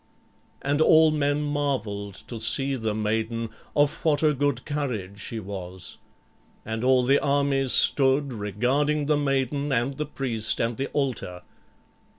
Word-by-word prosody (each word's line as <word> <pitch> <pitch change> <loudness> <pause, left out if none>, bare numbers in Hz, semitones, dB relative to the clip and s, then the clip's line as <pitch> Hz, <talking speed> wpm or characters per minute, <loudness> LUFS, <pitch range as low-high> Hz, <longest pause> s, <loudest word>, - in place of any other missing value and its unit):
And 145 +2 +1
all 160 0 +6
men 145 -1 0
marveled 130 -9 -2
to 115 - -7
see 135 +5 +2
the 110 -4 -2
maiden 110 +1 -2 0.2
of 145 -1 +1
what 155 -2 +2
a 150 -1 +4
good 140 -2 -1
courage 115 -10 -4
she 115 +1 -5
was. 95 -3 -5 0.7
And 110 +1 -4
all 130 0 +4
the 140 +2 +4
army 140 -1 +1
stood 135 +1 +4
regarding 125 +9 0
the 150 0 +2
maiden 140 0 -1
and 130 +2 0
the 150 -1 -3
priest 120 -7 -1
and 115 0 0
the 135 - -2
altar. 120 -11 -3
135 Hz, 145 wpm, -25 LUFS, 110-145 Hz, 0.7 s, all